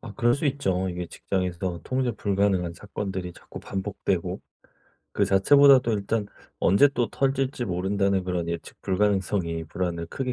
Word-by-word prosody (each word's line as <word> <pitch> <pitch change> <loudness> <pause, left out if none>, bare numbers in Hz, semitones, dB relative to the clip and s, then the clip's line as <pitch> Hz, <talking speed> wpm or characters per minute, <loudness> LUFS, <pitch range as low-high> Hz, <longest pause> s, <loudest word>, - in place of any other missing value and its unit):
아 105 - -9
그럴 120 -2 +3
수 145 +1 -1
있죠. 95 -10 0
이게 90 -1 -4
직장에서 90 -2 -3
통제 130 -2 -1
불가능한 100 -4 0
사건들이 95 -2 -5
자꾸 - - -11
반복되고 95 -2 -3 0.7
그 - - +2
자체보다도 130 +4 +6
일단 105 +1 -1 0.3
'언제 100 +11 +5
또 120 -5 -1
터질지 135 -2 0
모른다.'는 95 +1 0
그런 90 -2 -2
예측 85 -1 -6
불가능성이 95 -4 0
불안을 85 0 -3
크게 130 +7 -3
100 Hz, 350 characters per minute, -25 LUFS, 90-120 Hz, 0.7 s, 자체보다도